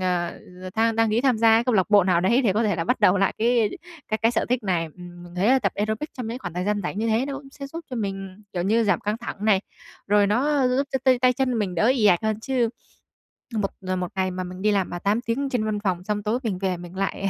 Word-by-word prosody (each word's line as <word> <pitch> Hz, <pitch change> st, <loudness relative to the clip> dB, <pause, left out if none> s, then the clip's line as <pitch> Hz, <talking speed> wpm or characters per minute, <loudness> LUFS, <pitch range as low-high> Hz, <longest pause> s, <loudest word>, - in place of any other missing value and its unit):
ờ, 180 Hz, -2 st, -1 dB, 0.4 s
than 225 Hz, 0 st, +2 dB
đăng 225 Hz, -1 st, +3 dB
ký 220 Hz, +2 st, +2 dB
tham 255 Hz, -3 st, +2 dB
gia 225 Hz, 0 st, +6 dB
cái 230 Hz, -, +2 dB
câu 250 Hz, -2 st, +1 dB
lạc 190 Hz, 0 st, +2 dB
bộ 205 Hz, -3 st, +6 dB
nào 180 Hz, -2 st, +3 dB
đấy 235 Hz, +9 st, +3 dB
để 215 Hz, -6 st, +3 dB
có 215 Hz, +4 st, +1 dB
thể 205 Hz, -5 st, +1 dB
là 165 Hz, -, -1 dB
bắt -, -, 0 dB
đầu 185 Hz, +2 st, +5 dB
lại 195 Hz, -, +1 dB
cái 230 Hz, -2 st, +2 dB, 0.4 s
cái 215 Hz, -, 0 dB
cái 225 Hz, -, +4 dB
sở 235 Hz, -, 0 dB
thích 250 Hz, -1 st, 0 dB
này. 180 Hz, -4 st, 0 dB
Ừm, 175 Hz, -1 st, -11 dB
mình 175 Hz, 0 st, -12 dB
thấy 180 Hz, +3 st, +1 dB
là 265 Hz, -, +5 dB
tập 255 Hz, -, -1 dB
aerobic 215 Hz, +8 st, -2 dB
trong 250 Hz, -3 st, -6 dB
những 230 Hz, +3 st, -4 dB
khoảng 175 Hz, -9 st, -7 dB
thời 180 Hz, +1 st, -2 dB
gian 205 Hz, +1 st, 0 dB
rảnh 190 Hz, +3 st, -4 dB
như 225 Hz, -, 0 dB
thế 225 Hz, +4 st, +1 dB
nó 280 Hz, -, -4 dB
cũng 275 Hz, -1 st, -14 dB
sẽ 275 Hz, 0 st, -8 dB
giúp 325 Hz, +4 st, -7 dB
cho 250 Hz, -, -4 dB
mình, 195 Hz, -2 st, -5 dB
kiểu 175 Hz, -2 st, -2 dB
như, 225 Hz, +4 st, +2 dB
giảm 205 Hz, -, +2 dB
căng 210 Hz, +1 st, -2 dB
thẳng 230 Hz, -3 st, -6 dB
này, 205 Hz, -3 st, +4 dB, 0.5 s
rồi 205 Hz, 0 st, +4 dB
nó 265 Hz, +5 st, +2 dB
giúp 265 Hz, +3 st, +1 dB
cho 265 Hz, -, +1 dB
t 265 Hz, -, +6 dB
tay 255 Hz, 0 st, +5 dB
chân 265 Hz, 0 st, 0 dB
của 235 Hz, -, -1 dB
mình 195 Hz, -4 st, -2 dB
đỡ 195 Hz, +6 st, +2 dB
ì 250 Hz, -5 st, +3 dB
ạch 180 Hz, -4 st, +4 dB
hơn. 220 Hz, 0 st, -1 dB
Chứ 250 Hz, -1 st, 0 dB, 0.9 s
một 205 Hz, -2 st, 0 dB, 0.3 s
một 180 Hz, 0 st, -2 dB
ngày 190 Hz, -1 st, 0 dB
mà 185 Hz, 0 st, -4 dB
mình 180 Hz, +1 st, -8 dB
đi 210 Hz, -, +3 dB
làm 195 Hz, -3 st, +1 dB
mà 175 Hz, -, -5 dB
8 205 Hz, +5 st, +1 dB
tiếng 260 Hz, +4 st, -2 dB
trên 245 Hz, -4 st, 0 dB
văn 215 Hz, -1 st, -1 dB
phòng, 185 Hz, -4 st, -2 dB
xong 205 Hz, +1 st, -2 dB
tối 220 Hz, +3 st, 0 dB
mình 210 Hz, -6 st, -2 dB
về 185 Hz, -2 st, -1 dB
mình 175 Hz, +1 st, -10 dB
lại 195 Hz, 0 st, -2 dB
210 Hz, 290 wpm, -24 LUFS, 190-235 Hz, 0.9 s, gia